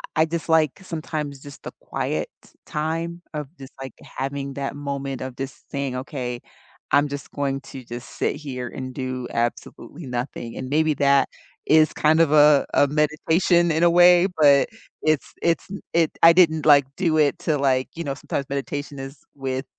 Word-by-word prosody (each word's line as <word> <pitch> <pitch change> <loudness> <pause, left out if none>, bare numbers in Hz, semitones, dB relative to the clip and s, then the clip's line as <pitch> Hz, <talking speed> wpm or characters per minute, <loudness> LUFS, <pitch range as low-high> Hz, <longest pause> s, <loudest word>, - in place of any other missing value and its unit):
I 160 - +4
dislike, 160 -2 +1
sometimes, 155 -5 -5
just 145 -1 -12
the - - -7
quiet - - -3 0.4
time, 165 +2 -3
of 150 -2 -4
just, 135 0 -12
like, 130 -3 -7
having 135 +1 -5
that 140 0 -4
moment 140 -2 -4
of 130 -1 -6
just 135 +1 -8
saying, 140 -2 -3
"Okay, 125 -2 -4 0.5
I'm 145 +1 +4
just 140 0 -7
going 140 -1 -2
to 135 -1 -10
just 120 +1 -8
sit - - 0
here, 130 -4 -6
and 130 +1 -7
do 130 -1 -4
absolutely 120 +6 -4
nothing," 120 -2 -5
and 130 - -5
maybe 155 +2 +2
that 140 -1 +3 0.4
is 155 0 +4
kind 155 +1 +3
of 160 -3 +3
a 150 -1 +6
a 145 - +5
meditation, 160 +4 +2
in 160 +1 0
a 175 - +6
way, 175 +1 +6
but 140 -2 +5 0.3
it's 155 -2 0
it's 170 -1 +1
n 200 - -5
it 165 -2 +3
I 165 - +10
didn't, 160 -3 +4
like, 145 -2 +7
do 165 -4 +1
it 150 -2 +2
to, 155 -2 0
like, 130 -2 +1
you 170 - -4
know 140 -3 -3
sometimes 140 0 -4
meditation 140 +1 -4
is 135 +2 -8 0.2
with, 135 -1 -3
145 Hz, 175 wpm, -23 LUFS, 135-160 Hz, 0.5 s, I